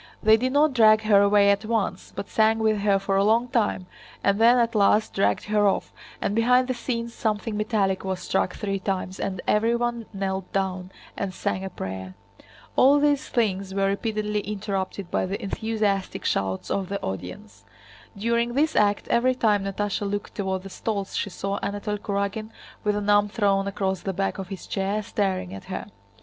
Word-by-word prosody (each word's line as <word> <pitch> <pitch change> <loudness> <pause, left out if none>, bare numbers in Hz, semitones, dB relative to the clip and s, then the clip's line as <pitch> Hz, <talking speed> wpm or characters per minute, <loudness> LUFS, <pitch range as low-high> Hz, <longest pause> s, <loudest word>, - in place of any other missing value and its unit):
They 220 0 +7
did 255 +3 0
not 290 +1 +3
drag 220 -2 +5
her 205 -2 +5
away 200 0 +5
at 200 +1 0
once, 215 -4 -2
but - - -5
sang 220 0 +3
with 220 -1 +1
her 200 -1 +3
for 195 0 0
a 195 - +4
long 225 +4 +3
time 220 -6 0 0.4
and 200 +2 +2
then 240 +2 +7
at 235 -1 +2
last 210 0 +3
dragged 100 0 +1
her 210 -1 +2
off, 195 - -1 0.3
and - - -1
behind 250 +3 +3
the 255 - 0
scenes 235 -1 -4
something 215 -1 -2
metallic 210 -3 0
was 190 -1 -2
struck 180 - -1
three 195 -1 -2
times 190 -1 -3
and 190 -2 -3
everyone 235 +1 +1
knelt 190 -2 -3
down 185 -1 -2 0.2
and 190 -2 -4
sang 190 - -2
a 190 - -4
prayer. 95 - -6 0.6
All 275 +3 +6
these 290 0 +1
things 195 -5 -1
were 195 0 +2
repeatedly 210 +1 -1
interrupted 200 -2 -4
by - - 0
the 195 +2 -3
enthusiastic 205 -2 -2
shouts 95 -1 -1
of 195 -2 -1
the 200 0 -2
audience. 95 +4 -7 0.5
During 235 +3 0
this 310 +3 +2
act 205 -1 +2
every 255 +2 +3
time 210 -5 +2
Natásha 200 +1 -2
looked 205 0 -4
toward 190 -2 -2
the 195 - -8
stalls 200 -1 -3
she - - -1
saw 195 +1 -3
Anatole 205 +1 -3
Kurágin 200 +2 -2 0.3
with 210 -1 +1
an 205 0 -2
arm 205 0 +4
thrown 200 -2 +1
across 190 -1 -2
the 195 - -3
back 195 +1 -2
of 190 - -5
his 195 -1 -8
chair, 200 +2 -1
staring 190 - -2
at 95 - -9
her. - - -5
205 Hz, 185 wpm, -25 LUFS, 195-220 Hz, 0.6 s, They